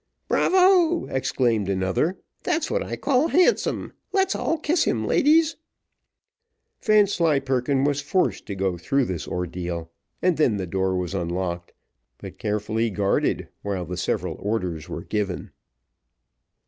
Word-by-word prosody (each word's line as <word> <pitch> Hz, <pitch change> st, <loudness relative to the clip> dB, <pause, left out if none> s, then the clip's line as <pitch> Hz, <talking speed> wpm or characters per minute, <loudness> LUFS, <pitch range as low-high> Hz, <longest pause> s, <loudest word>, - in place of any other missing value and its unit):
"Bravo!" 360 Hz, -2 st, +4 dB
exclaimed 120 Hz, -6 st, 0 dB
another, 95 Hz, -, 0 dB, 0.2 s
"that's 320 Hz, 0 st, -1 dB
what -, -, +1 dB
I -, -, -4 dB
call 280 Hz, +2 st, +2 dB
handsome; 365 Hz, +7 st, +2 dB, 0.2 s
let's 385 Hz, -1 st, +2 dB
all 325 Hz, -, 0 dB
kiss 315 Hz, +2 st, +1 dB
him, 110 Hz, -2 st, 0 dB
ladies." 315 Hz, -, +3 dB, 1.2 s
Vanslyperken 145 Hz, -, +2 dB
was 145 Hz, 0 st, +1 dB
forced 185 Hz, +5 st, 0 dB
to 100 Hz, -, -4 dB
go 95 Hz, -2 st, -1 dB
through 135 Hz, +9 st, +1 dB
this 90 Hz, -7 st, -4 dB
ordeal, 85 Hz, -1 st, -4 dB, 0.3 s
and 180 Hz, -2 st, +2 dB
then 125 Hz, -9 st, +3 dB
the 95 Hz, -, -3 dB
door 95 Hz, +1 st, -1 dB
was 90 Hz, 0 st, -3 dB
unlocked, 85 Hz, -1 st, -3 dB, 0.4 s
but -, -, -10 dB
carefully 110 Hz, +2 st, -1 dB
guarded, 100 Hz, -1 st, 0 dB
while 95 Hz, -3 st, -3 dB
the 90 Hz, +2 st, -5 dB
several 90 Hz, -, -2 dB
orders 90 Hz, -7 st, -3 dB
were 85 Hz, -, -5 dB
given. 100 Hz, -3 st, -3 dB
110 Hz, 130 wpm, -24 LUFS, -, 1.2 s, Bravo